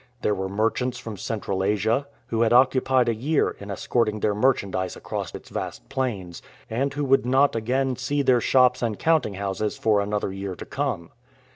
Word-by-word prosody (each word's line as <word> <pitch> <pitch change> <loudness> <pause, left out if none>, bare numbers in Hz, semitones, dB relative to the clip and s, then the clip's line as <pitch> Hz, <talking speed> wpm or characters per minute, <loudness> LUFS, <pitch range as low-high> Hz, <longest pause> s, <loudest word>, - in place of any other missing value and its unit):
There 105 - +2
were 95 -1 -3
merchants 115 +5 0
from 115 -3 -7
Central 100 -1 -3
Asia, 110 +7 +1 0.2
who 115 0 -1
had 115 0 +3
occupied 130 0 +4
a 115 - +2
year 140 +8 +1
in 100 - -9
escorting 110 +2 0
their 105 0 +1
merchandise 100 -5 0
across - - -5
its - - -10
vast - - -6
plains, 110 -11 -3 0.3
and 135 +5 0
who 145 +1 -2
would 135 0 +4
not 130 +3 +3
again 130 +4 0
see 140 +3 -1
their 125 -2 +4
shops 125 0 +4
and 115 -4 -1
counting 155 -11 +2
houses 100 +2 -2
for 105 -2 +2
another 100 -1 -2
year 95 -1 -5
to - - -8
come. 85 -1 -3
115 Hz, 180 wpm, -24 LUFS, 100-130 Hz, 0.3 s, occupied